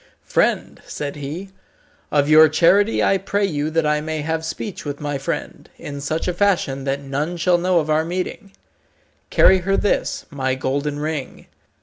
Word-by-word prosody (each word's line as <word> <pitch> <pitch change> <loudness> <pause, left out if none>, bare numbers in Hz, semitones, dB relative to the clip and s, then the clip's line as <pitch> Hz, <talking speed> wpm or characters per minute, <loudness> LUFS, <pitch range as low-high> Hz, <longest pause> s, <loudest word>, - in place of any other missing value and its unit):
"Friend," - - 0
said 145 -1 -5
he, 155 +7 -6 0.6
"of 145 -1 +2
your 155 +1 +7
charity 190 +7 +3
I 195 - +3
pray 200 +2 0
you 150 -5 -1
that 160 0 0
I 150 0 +1
may 155 0 -3
have 160 +1 -2
speech 160 +5 -5
with 145 -1 -5
my 145 -2 -3
friend, 135 - -5
in 140 -1 -7
such 155 +5 -2
a 180 - 0
fashion 170 -8 0
that 140 +1 -1
none 145 +6 -3
shall 175 +1 +2
know 180 0 +2
of 155 - -2
our 155 +1 +3
meeting. 185 +4 -4 0.8
Carry 190 0 +5
her 195 +2 0
this, 205 - 0
my 130 -2 -1
golden 140 +3 -2
ring. 150 -2 -4
155 Hz, 175 wpm, -21 LUFS, 145-180 Hz, 0.8 s, your